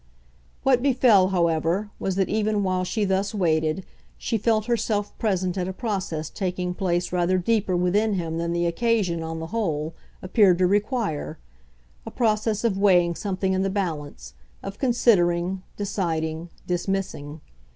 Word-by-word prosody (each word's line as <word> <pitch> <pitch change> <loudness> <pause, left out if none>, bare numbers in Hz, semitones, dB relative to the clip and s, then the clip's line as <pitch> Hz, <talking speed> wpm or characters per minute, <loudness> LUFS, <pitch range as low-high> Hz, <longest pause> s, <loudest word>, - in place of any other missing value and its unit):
What 260 -2 +4
befell, 245 -8 +4
however, 175 +2 0
was 190 - -2
that 190 -1 +1
even 215 -1 0
while 185 -1 0
she 210 +3 -1
thus 195 +2 0
waited 160 -1 +1 0.3
she - - -2
felt 215 0 +1
herself 220 -3 -1
present 185 -3 0
at 180 - -1
a 190 - -4
process 185 - -3
taking 180 -2 -2
place 180 -1 -1
rather 180 +1 +2
deeper 200 0 +1
within 205 +5 +2
him 165 -3 -2
than 170 0 -1
the 170 0 0
occasion, 185 -2 +1
on 160 0 -4
the 160 - -4
whole, 160 -8 -1 0.3
appeared 185 -1 +4
to 185 - +3
require 205 - -1 0.7
a - - -7
process 215 -2 0
of 205 -5 +1
weighing 180 -4 +4
something 190 +1 -2
in 190 - +1
the 195 - 0
balance, 150 - -4 0.3
of 195 0 -7
considering, 190 -8 +2 0.2
deciding, 165 -5 -2 0.2
dismissing. 175 -5 -3
190 Hz, 150 wpm, -24 LUFS, 170-210 Hz, 0.7 s, What